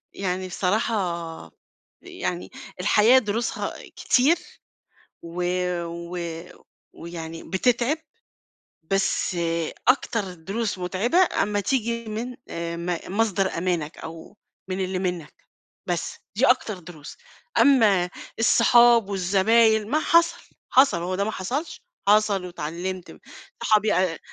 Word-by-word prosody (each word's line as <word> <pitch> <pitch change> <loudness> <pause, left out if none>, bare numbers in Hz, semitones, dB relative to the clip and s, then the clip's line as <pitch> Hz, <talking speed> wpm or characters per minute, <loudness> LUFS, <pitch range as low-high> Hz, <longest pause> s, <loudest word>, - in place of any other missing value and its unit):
يعني 185 -1 -3
بصراحة 180 -4 -2 0.5
يعني 360 - -5 0.3
الحياة 215 +6 +5
دروسها 225 0 -2 0.2
كتير، 285 +7 +3 0.9
و 170 +1 -4 0.4
و 170 +1 -7 0.8
ويعني 165 -1 -8
بتتعِب، 245 +8 +1 0.9
بس 195 0 0 0.5
أكتر 225 -7 +1
دروس 195 +6 -3
متعبة 190 - 0 0.3
أمّا 205 0 -1
تيجي 235 +1 -1
من 225 +3 -5
آآ، 170 0 -4
م 170 0 -2 0.2
مصدر 195 -5 +1
أمانك 170 -3 -2
أو 165 +5 -10 0.3
من 185 +1 -2
اللي 185 0 -3
منّك، 180 -5 -3 0.5
بس، 175 -2 -2 0.2
دي 255 - +4
أكتر 240 -7 +2
دروس. 160 -4 -11 0.4
أمّا 210 -10 +5 0.3
الصُحاب 235 -1 +5
والزباين 210 +3 +3
ما 305 - +3
حصل 335 +1 +3 0.3
حصل 265 -7 +5
هو 185 +1 -2
ده 200 - 0
ما 220 - -2
حصلش، 285 - -4 0.3
حصل 205 -3 +3
واتعلِّمت 180 +2 -5
م - - -15 0.4
صحابي 215 0 +3
أ 180 -2 +1
195 Hz, 110 wpm, -24 LUFS, 180-230 Hz, 0.9 s, الحياة